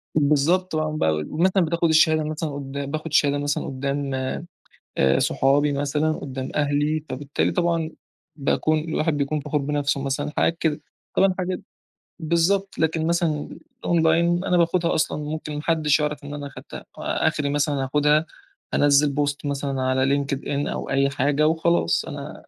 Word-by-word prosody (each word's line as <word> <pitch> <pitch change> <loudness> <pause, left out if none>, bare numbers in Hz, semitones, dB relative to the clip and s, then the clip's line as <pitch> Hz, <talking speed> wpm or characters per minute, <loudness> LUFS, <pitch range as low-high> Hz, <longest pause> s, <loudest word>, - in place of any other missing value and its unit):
بالضبط، 155 +5 +2
آه، 155 0 0
ب - - +1 0.4
مثلًا 185 -1 +3
بتاخد 170 0 +1
الشهادة 155 0 +4
مثلًا 155 +1 -3
قُدّام 140 0 -5
باخد 155 +1 -4
الشهادة 145 -2 +3
مثلًا 145 0 -1
قُدّام 140 +1 -3 0.9
آآ 65 0 +4
صحابي 145 +2 +2
مثلًا، 145 +2 0
قُدّام 130 -3 -5
أهلي، 150 +1 0
فبالتالي 140 +2 -1
طبعًا 170 -2 0 0.5
باكون 155 +2 +1
الواحد 155 0 -1
بيكون 145 +1 -1
فَخور 150 +1 -1
بنفْسه 140 -1 -1
مثلًا، 145 +2 -2
حاجات 165 - +1
كده، 155 -2 0 0.3
طبعًا 190 -1 +3
حاجة 185 0 -2 0.6
بالضبط، 175 +4 +1
لكن 160 0 +1
مثلًا 165 -3 0 0.3
الأونلاين، 170 +1 +2
أنا 180 - +2
باخدها 170 0 +2
أصلًا، 155 - 0
ممكن 150 0 -5
ما 150 - -3
حدِّش 155 -2 +2
يعرف 150 -1 -2
إن 145 - -7
أنا 145 -1 -5
أخدتها، 140 - -10
آخْري 145 -1 0
مثلًا 145 -1 0
هاخدها، 150 +3 +2 0.5
انزِّل 145 0 +4
بوست 145 0 -1
مثلًا 140 -1 -2
على 130 +2 +2
LinkedIn 135 0 -4 0.2
أو - - -4
أي 140 0 +2
حاجة، 145 +2 +1
وخلاص 160 - +1
أنا - - -7
150 Hz, 150 wpm, -23 LUFS, 140-160 Hz, 0.9 s, الشهادة